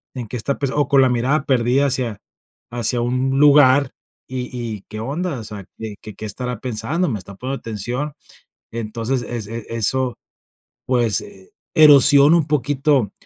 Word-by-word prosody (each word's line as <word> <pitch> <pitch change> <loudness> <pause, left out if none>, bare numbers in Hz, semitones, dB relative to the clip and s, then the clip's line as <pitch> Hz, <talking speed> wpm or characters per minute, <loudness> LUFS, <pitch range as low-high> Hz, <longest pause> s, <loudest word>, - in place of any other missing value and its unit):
¿en 120 -3 -5
qué 125 - -5
está 130 +5 -2
pensando? 140 +1 0
O 145 - 0
con 140 -1 +4
la 130 - +3
mirada 130 +5 0
perdida 130 +1 +2
hacia 125 -6 -2 0.5
hacia 120 0 0
un 130 +3 0
lugar, 145 -2 +5 0.3
y 125 -1 -4 0.3
y 100 - -12
¿qué 110 - -7
onda?, 145 +6 -3
o - - -7
sea, 100 -3 -8
de 110 -2 -7
que, 105 -2 -10
¿qué 110 - -7
estará 125 +2 -5
pensando?, 140 +9 -2
¿me 110 -5 -3
está 95 +1 -11
poniendo 130 +6 -5
atención? 120 +7 -4 0.6
Entonces, 115 +3 -3
es, 120 -3 -5
e 115 +1 -5
es 115 - -10
eso, 125 +3 0 0.7
pues, 120 -4 +1
eh, 95 -1 -14 0.2
erosiona 145 +1 +7
un 160 - +1
poquito, 145 -4 +1
125 Hz, 170 wpm, -20 LUFS, 115-140 Hz, 0.7 s, erosiona